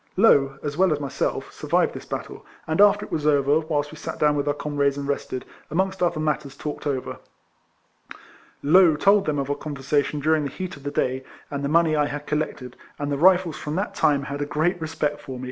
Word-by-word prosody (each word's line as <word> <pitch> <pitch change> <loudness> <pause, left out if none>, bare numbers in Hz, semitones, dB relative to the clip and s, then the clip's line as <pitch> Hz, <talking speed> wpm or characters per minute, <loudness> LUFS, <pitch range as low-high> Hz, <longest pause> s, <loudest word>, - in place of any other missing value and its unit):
Low, 135 -10 +4
as 145 0 -4
well 190 -1 +4
as 150 - 0
myself, 140 -3 -3
survived - - +1
this - - -9
battle, - - -6 0.2
and 160 +4 +1
after 205 0 +5
it - - -16
was 155 -1 -1
over, 145 0 +3
whilst 150 -2 -2
we 155 - -11
sat - - -5
down 150 -1 +3
wjth 145 0 -1
our 145 - +1
comrades 145 -2 0
and 140 0 -4
rested, 140 -2 -3 0.2
amongst 190 +4 -1
other 170 -3 +1
matters 150 -3 -2
talked 150 0 -5
over. 135 -3 -3 1.4
Low 170 +1 +6
told 200 +5 +4
them 150 -1 0
of 140 0 -2
our - - 0
conversation 145 0 -1
during 155 +1 +2
the - - -2
heat 185 +3 -6
of 140 - -14
the 145 - -4
day, 130 -1 -1 0.3
and 140 -1 -3
the 140 - -1
money 165 0 +3
I 150 -1 +2
had 145 0 -6
collected, 150 -5 -3 0.2
and 145 0 -3
the 140 - 0
Rifles 180 -1 +4
from 150 +1 -4
that 200 +4 -2
time 140 -2 +2
had 140 +1 -5
a - - 0
great 165 +4 0
respect 150 -2 -2
for 135 - -8
me. - - -9
150 Hz, 220 wpm, -24 LUFS, 140-160 Hz, 1.4 s, Low